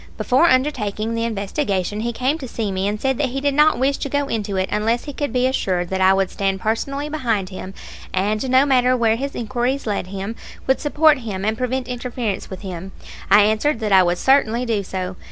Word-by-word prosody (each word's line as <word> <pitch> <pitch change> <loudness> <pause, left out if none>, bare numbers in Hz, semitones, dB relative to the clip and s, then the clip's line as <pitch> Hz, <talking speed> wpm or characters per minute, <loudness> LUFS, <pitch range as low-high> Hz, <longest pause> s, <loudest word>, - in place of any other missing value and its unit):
Before 265 +7 +3
undertaking 230 -6 0
the 230 0 -1
investigation 205 - -2
he 235 +2 -1
came 260 +7 -1
to 265 - -6
see 220 -3 -3
me, 190 +1 -1
and 210 +1 -2
said 265 +1 0
that 280 -3 +1
he 270 +2 -3
did 285 0 0
not 300 +2 +4
wish 270 +2 +1
to 280 - -4
go 285 +1 0
into 205 -5 -2
it 185 0 0
unless 225 +3 0
he 290 - -7
could 285 -2 -3
be 250 +1 +1
assured 185 -9 0
that 190 0 -2
I 190 0 +6
would 195 -1 +1
stand 195 -1 -1
personally 275 +8 -2
behind 230 -11 -1
him, 190 0 -8 0.4
and, 210 +6 -1
no 260 +2 +5
matter 255 -2 +3
where 225 -2 +3
his 275 +4 -4
inquiries 245 +3 -2
led 205 -4 -2
him, 195 +3 -5 0.3
would 265 - +1
support 300 -1 +4
him 205 -5 -4
and 220 +1 +1
prevent 255 +1 -2
interference 245 -4 -4
with 190 -1 -8
him. 190 -1 -7 0.4
I 205 +1 +7
answered 220 +6 +2
that 215 -2 -1
I 190 -1 +7
would 175 0 +1
certainly 250 -2 +2
do 225 -4 0
so. 185 -1 -5
230 Hz, 220 wpm, -21 LUFS, 195-265 Hz, 0.4 s, I